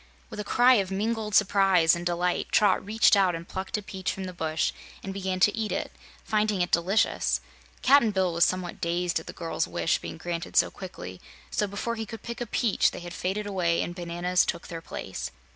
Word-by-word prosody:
With - - -7
a - - -2
cry 245 +5 +5
of 190 - -5
mingled 210 +1 -1
surprise 195 -5 +4
and 170 - -5
delight 175 0 0
Trot 210 - +4
reached 220 +2 +4
out 190 -3 +3
and 165 +1 -8
plucked 190 +2 -3
a 210 - -6
peach 190 -2 -3
from 190 - -6
the 185 -1 -6
bush 160 -2 -1 0.3
and 195 - -5
began 190 -1 -2
to 205 - +5
eat 220 -1 -2
it, - - -2 0.3
finding 210 -3 +1
it 175 - -4
delicious. 190 +6 +2 0.4
Cap'n 265 -3 +6
Bill 190 -4 0
was 170 +1 +3
somewhat 185 -2 -1
dazed 170 0 0
at 160 - -13
the - - -5
girl's 165 -2 -3
wish 165 - 0
being - - -7
granted 170 0 -4
so - - +5
quickly, 95 - -9 0.3
so 210 - 0
before 200 +4 -3
he 220 -1 -4
could 225 -2 -9
pick 235 0 -6
a 240 - -2
peach 230 0 +2
they - - -8
had 175 0 -8
faded 195 +4 -2
away 180 -4 +1
and 175 - -5
bananas 175 +1 0
took 170 - -4
their 165 -1 -6
place. 95 - -6
185 Hz, 210 wpm, -27 LUFS, 175-210 Hz, 0.4 s, Cap'n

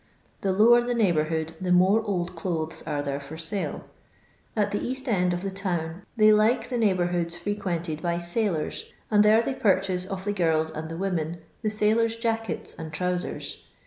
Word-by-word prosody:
The 195 - +1
lower 230 +5 +6
the 240 0 -1
Dcighbonrhood 160 -6 +1
the 180 -1 -1
more 190 +5 +5
old 185 -4 -2
clothes 165 -2 -3
are 145 -2 -1
there 140 0 -2
for 145 +3 -9
sale. 165 +5 -3 0.7
At 210 -2 +1
the 205 - -2
east 260 +2 -3
end 180 -6 +2
of 175 +1 -2
the 195 - -2
town 180 -2 -3
they 215 -1 +7
like 220 +4 +3
the 250 - -1
neighbonrhoods 175 -5 +1
frequented 175 -4 -3
by 170 -1 0
sailors, 175 -2 -2 0.2
aud 210 -1 +6
there 215 +2 +5
they 270 - -1
purchase 190 -6 +1
of 190 0 -5
the 205 - 0
girls 160 -4 +1
and 160 0 -6
the 165 - -5
.women 170 -3 -2 0.2
the 215 - 0
sailon^ 225 +2 +1
jackets 225 -3 -1
and 160 -1 -6
trowscrs. 180 +3 -3
185 Hz, 175 wpm, -26 LUFS, 165-215 Hz, 0.7 s, they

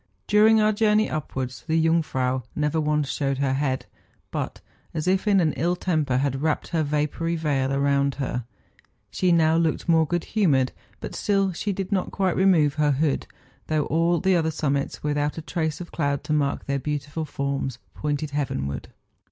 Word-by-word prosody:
During 215 +1 +5
our 215 0 +4
journey 215 0 +3
upwards, 130 -4 -4
the 160 0 +2
Jungfrau 140 -6 +1
never 150 +1 0
once 150 -1 +1
showed 135 -1 -1
her 135 -1 +1
head, 135 -1 -1 0.5
but, - - -4 0.4
as 155 +2 -2
if 190 +3 +1
in 200 -2 +5
ill 175 +2 0
temper, 155 -8 0
had 135 0 0
wrapped 155 -1 0
her 165 - 0
vapoury 150 +3 -1
veil 140 -4 0
around 140 0 +1
her. 130 -3 -3 0.7
She 180 -1 +1
now 160 -1 +4
looked 165 -2 0
more 160 -2 +4
good 175 +1 -1
humoured, 145 - +2 0.3
but - - -6
still 195 -2 +1
she 205 +4 -2
did 195 +1 -4
not 190 -3 0
quite 190 -3 0
remove 170 -7 +4
her 145 -1 +3
hood, 145 +1 0 0.4
though 155 -2 +1
all 165 +2 +2
the 190 0 +3
other 160 -2 +2
summits, 140 -3 -2
without 145 0 0
a - - -3
trace 160 -2 -2
of 175 - -8
cloud 140 -3 -1
to 155 - -2
mark 145 -2 0
their 140 0 -1
beautiful 145 +2 -3
forms, 140 -3 -3 0.2
pointed 150 0 -2
heavenward. 70 - -3
150 Hz, 175 wpm, -24 LUFS, 140-170 Hz, 0.7 s, During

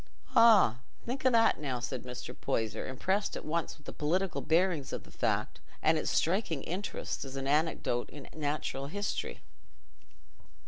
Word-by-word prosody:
"Ah! 220 - +7 0.3
Think 260 +2 0
o' - - +7
that, 230 -2 +4
now!" 135 -5 -2
said 125 +1 -4
Mr. 125 0 -7
Poyser, 110 -1 -2
impressed 190 +10 0
at - - -8
once 165 +1 -2
with 150 - -23
the - - -7
political 175 +5 0
bearings 165 -3 +2
of - - -4
the - - -16
fact - - -1 0.2
and 160 - +5
with 155 - -1
its - - 0
striking 170 -4 +1
interest 190 +5 -3
as 135 -1 -8
an 135 0 -3
anecdote 145 -4 +1
in 145 -2 -10
natural 145 -2 -2
history. 205 +7 -3
155 Hz, 165 wpm, -31 LUFS, 135-190 Hz, 0.3 s, Ah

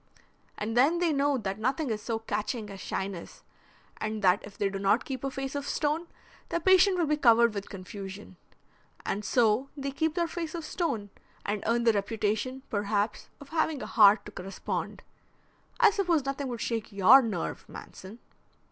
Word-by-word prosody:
And 220 +2 -3
then 280 +8 +4
they 340 -2 +1
know 280 0 +2
that 195 -3 -4
nothing 260 +4 0
is 215 -1 -2
so 225 +1 -2
catching 215 0 -3
as 195 - -9
shyness, 190 -2 -5 0.5
and 215 0 -4
that 185 +3 +4
if 200 0 -12
they 200 - +1
do 195 0 -4
not 200 +4 +2
keep 265 -2 -5
a 275 - 0
face 270 0 -5
of 285 -1 -4
stone, 310 +3 -1 0.4
their 340 - 0
patient 375 +2 +5
will 345 - +2
be 300 0 +1
covered 235 -4 +5
with 200 -1 -5
confusion. 195 +1 -8 0.7
And 205 - -2
so 235 +3 +2
they 275 0 -3
keep 315 +3 -1
their 340 -2 +1
face 330 -1 -5
of 330 -2 -5
stone, 265 - -2 0.3
and 205 0 -1
earn 235 +1 +2
the 230 -1 +4
reputation 220 +5 -1
perhaps 205 0 -1
of 285 - -13
having 315 -3 0
a - - -4
heart 210 -1 +5
to 210 - -9
correspond. 195 0 -5 0.8
I 445 -4 +7
suppose 350 -8 +1
nothing 275 0 -2
would 240 -2 -5
shake 225 -2 -2
your 210 +7 +7
nerve, 215 -9 -4
Manson." 190 +4 -10
235 Hz, 180 wpm, -28 LUFS, 205-285 Hz, 0.8 s, I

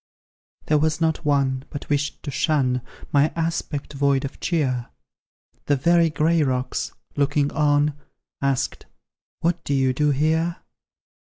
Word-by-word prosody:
There 150 -1 +3
was 155 +1 +1
not 160 -1 0
one, 135 -3 +1
but 145 - -7
wished 145 0 -1
to 145 - -4
shun 130 -4 +1 0.3
My 145 +2 +4
aspect 165 -3 -2
void 140 -1 +2
of 135 - -7
cheer; 130 -8 0 0.8
The 145 - +4
very 170 +4 +4
gray 160 +2 +2
rocks, 130 -2 -1 0.2
looking 145 0 +1
on, 145 0 +2 0.5
Asked, 135 -1 -1 0.5
"What 170 0 0
do 140 - 0
you 130 -1 +3 0.2
here?" 160 +4 +1
145 Hz, 125 wpm, -23 LUFS, 140-160 Hz, 0.8 s, My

